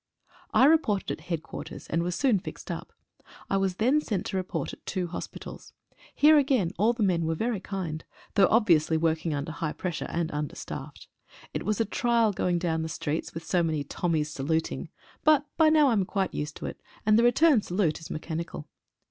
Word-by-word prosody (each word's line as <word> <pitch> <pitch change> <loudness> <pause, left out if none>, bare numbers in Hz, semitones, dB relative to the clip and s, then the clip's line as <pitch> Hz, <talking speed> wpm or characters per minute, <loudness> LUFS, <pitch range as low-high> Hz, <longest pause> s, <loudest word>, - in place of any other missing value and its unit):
I 260 - +6
reported 280 -10 +3
at 160 - -17
Headquarters, 165 -3 -5
and 165 - -1
was 175 0 -2
soon 245 -6 +3
fixed - - -8
up. - - -6 0.6
I 195 - +3
was 195 -2 0
then 255 +9 +3
sent 205 -10 -2
to - - -4
report 185 0 -2
at - - -13
two 185 -2 -1
hospitals. 170 0 -8 0.4
Here 300 +1 +7
again 260 -11 +2
all 220 +4 +4
the 230 -2 -1
men 170 -4 +2
were 165 - 0
very 225 +3 -1
kind, 180 -5 -4 0.3
though 195 -2 +5
obviously 170 -8 +4
working 160 -1 0
under 145 +3 -3
high 155 -1 -3
pressure 175 -4 -4
and 165 -1 -2
understaffed. 150 -1 -6 0.5
It - - -4
was 215 0 0
a 225 - +2
trial 230 0 +2
going 180 -1 0
down 165 -2 0
the 160 - -3
streets 155 +1 -3
with 165 0 -6
so 180 +1 +2
many 155 -3 0
Tommies 155 0 -1
saluting, 160 +3 -2 0.3
but 300 -2 +5
by 320 -1 +5
now 305 -3 +5
I - - +3
am 200 -4 +2
quite 195 -1 -1
used 150 +1 -4
to - - -7
it, - - -6 0.2
and 215 +1 +5
the - - +4
return 250 +1 +5
salute 175 -5 0
is 160 - -10
mechanical. 160 - -5
180 Hz, 195 wpm, -27 LUFS, 160-225 Hz, 0.6 s, Here